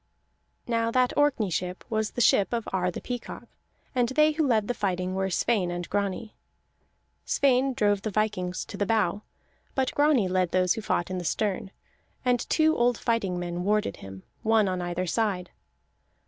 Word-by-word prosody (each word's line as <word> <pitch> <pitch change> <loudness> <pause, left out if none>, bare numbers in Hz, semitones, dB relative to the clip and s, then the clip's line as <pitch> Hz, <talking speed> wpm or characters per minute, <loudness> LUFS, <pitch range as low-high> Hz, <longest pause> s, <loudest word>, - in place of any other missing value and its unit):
Now 230 -1 0
that 250 +1 +2
Orkney 275 -9 +2
ship 180 +2 -3
was 220 -1 -1
the - - +2
ship 210 -1 +4
of 230 -2 -2
Ar 180 -1 +1
the 180 - -5
Peacock, 245 -1 -6 0.5
and 245 -3 +1
they 305 +3 +4
who 305 -1 0
led 220 -4 +2
the 245 - 0
fighting 185 -4 -2
were 190 0 -1
Sweyn 190 0 +1
and 175 0 -4
Grani. 205 +2 -2 0.9
Sweyn 265 -1 +2
drove 205 -3 +2
the 215 - -2
vikings 190 -4 -1
to 200 - -8
the 205 - 0
bow; 215 -2 +1 0.5
but 265 -1 0
Grani 290 -8 +3
led 185 -1 +1
those 185 -1 +3
who 225 - -5
fought 180 -4 -1
in 185 - -2
the - - -5
stern, 195 +2 -1 0.6
and 245 -1 +1
two 315 0 +3
old 240 -1 +2
fighting 215 -6 0
men 175 0 -3
warded 210 - 0
him, 95 0 -10 0.2
one 220 -2 +3
on 185 -1 -1
either 175 +1 -2
side. 185 -2 -1
210 Hz, 175 wpm, -27 LUFS, 185-240 Hz, 0.9 s, ship